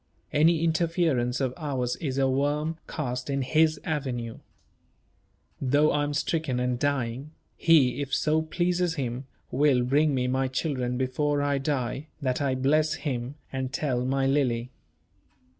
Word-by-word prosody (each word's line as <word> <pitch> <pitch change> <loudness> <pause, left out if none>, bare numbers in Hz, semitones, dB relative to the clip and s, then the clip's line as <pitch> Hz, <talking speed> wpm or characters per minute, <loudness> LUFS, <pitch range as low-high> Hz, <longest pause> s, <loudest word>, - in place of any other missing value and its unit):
Any 160 +2 +4
interference 160 -7 +1
of 130 -2 0
ours 130 -5 -2
is 135 -4 -3
a 135 -1 +3
worm 145 +4 0
cast 125 -3 -4
in 135 -1 0
His 155 +3 +3
avenue. 125 -7 -3 1.2
Though 145 +3 +3
I 145 - +1
am 145 0 -2
stricken 150 -4 -1
and 125 -1 0
dying, 140 +1 -1 0.2
He, 140 -5 +4
if 140 -1 -4
so 155 +3 +2
pleases 175 +1 0
Him, 130 -2 -3 0.2
will 135 -2 +3
bring 145 +3 +2
me 125 -1 0
my 130 +1 +1
children 130 -2 -2
before 145 +3 0
I 140 -1 +1
die, 135 0 -2
that 130 -3 -1
I 135 -2 +1
may 130 - -5
bless 155 +3 +3
Him, 130 -4 -4 0.2
and 130 -1 -2
tell 125 -2 -1
my 135 +1 +1
Lily." 130 -3 +1
140 Hz, 150 wpm, -27 LUFS, 125-155 Hz, 1.2 s, Any